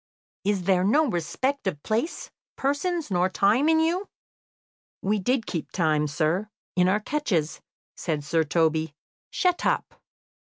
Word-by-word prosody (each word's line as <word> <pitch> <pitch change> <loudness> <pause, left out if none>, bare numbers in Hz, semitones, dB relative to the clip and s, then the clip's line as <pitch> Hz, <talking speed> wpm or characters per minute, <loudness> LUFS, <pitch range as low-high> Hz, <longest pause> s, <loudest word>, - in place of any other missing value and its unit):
Is 200 -2 0
there 185 0 +3
no 290 +11 +4
respect 260 - -1
of 150 -6 -3
place, 230 +9 -2 0.2
persons, 290 - -1
nor 180 0 +2
time 220 +10 +3
in 320 0 +4
you?" 345 +5 0 0.9
"We 210 +2 +1
did 240 +4 0
keep 165 -4 -4
time, 155 -4 +1
sir, 160 +8 0 0.3
in 180 0 +4
our 200 +3 +3
catches," 205 - -1 0.3
said 155 -4 -2
Sir 160 +2 +1
Toby. 160 -1 +1 0.3
"Shut 360 -2 +1
up!" - - -1
195 Hz, 135 wpm, -26 LUFS, -, 0.9 s, no